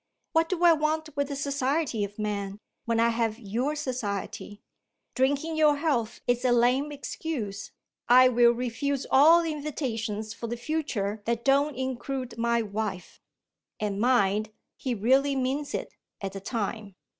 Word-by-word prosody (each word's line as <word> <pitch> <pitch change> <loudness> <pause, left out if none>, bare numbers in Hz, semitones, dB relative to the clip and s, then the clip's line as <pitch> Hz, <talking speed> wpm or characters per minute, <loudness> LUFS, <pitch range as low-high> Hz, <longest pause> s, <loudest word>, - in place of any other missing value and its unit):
What 325 0 +2
do 355 -2 -1
I 340 -1 +8
want 310 0 -1
with 285 -1 0
the 285 - -4
society 280 -3 -1
of 205 0 -6
men, 205 -2 -3 0.3
when 230 -1 +1
I 230 0 +4
have 225 -1 0
your 240 +7 -2
society? 210 -7 -4 0.5
Drinking 285 +5 0
your 305 -2 +4
health 285 -7 -1
is 245 0 +1
a 250 - +3
lame 250 +5 +3
excuse. 250 -8 -5 0.4
I 255 +1 +8
will 240 -1 +5
refuse 250 +3 -2
all 320 +5 +7
invitations 230 -9 -3
for 235 - -6
the 240 +1 -4
future 235 -7 -2
that 235 0 -1
don't 280 +1 +3
include 260 0 -4
my 235 0 +2
wife.' 205 -3 -5 0.6
And 205 -1 -2
mind! 215 -4 +2 0.3
he 255 -3 -3
really 265 +6 +3
means 270 +3 -1
it, - - -5 0.3
at 195 -1 -4
the 195 - -5
time. 210 -2 -4
250 Hz, 150 wpm, -27 LUFS, 220-285 Hz, 0.6 s, I